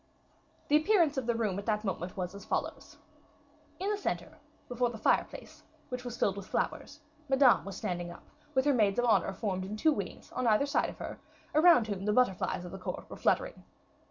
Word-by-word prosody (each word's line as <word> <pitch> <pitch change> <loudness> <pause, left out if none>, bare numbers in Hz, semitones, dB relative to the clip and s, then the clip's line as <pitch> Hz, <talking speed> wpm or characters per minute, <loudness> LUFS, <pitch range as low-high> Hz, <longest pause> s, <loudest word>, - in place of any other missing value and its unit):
The 295 - +5
appearance 325 -2 +3
of 255 -3 -2
the 235 - +2
room 210 -4 -1
at 200 - -9
that 210 -1 0
moment 185 -3 -4
was 180 0 -3
as 200 - -9
follows: - - -4 0.8
in 390 +3 -1
the 415 - 0
center, - - -4 0.3
before 245 0 0
the 235 - -7
fireplace, 220 - -1 0.3
which 250 -1 -5
was 245 -1 -6
filled 195 0 +1
with 200 - -7
flowers, - - -3 0.3
Madame 270 -2 +5
was 195 - -6
standing 175 -1 -3
up, 175 - -11 0.3
with 260 +1 +3
her 290 - +4
maids 210 -5 +2
of 245 - +2
honor 225 -4 +3
formed 190 -2 -3
in 205 +3 -5
two 315 +8 +4
wings, - - -6
on 255 - -1
either 220 +5 +4
side 285 - +1
of - - -10
her; - - -7 0.3
around 310 -5 +6
whom 200 -3 -4
the 210 - +2
butterflies 195 -6 +1
of 175 - -8
the 195 - -7
court 185 - -5
were - - -6
fluttering. - - 0
220 Hz, 210 wpm, -31 LUFS, 195-265 Hz, 0.8 s, around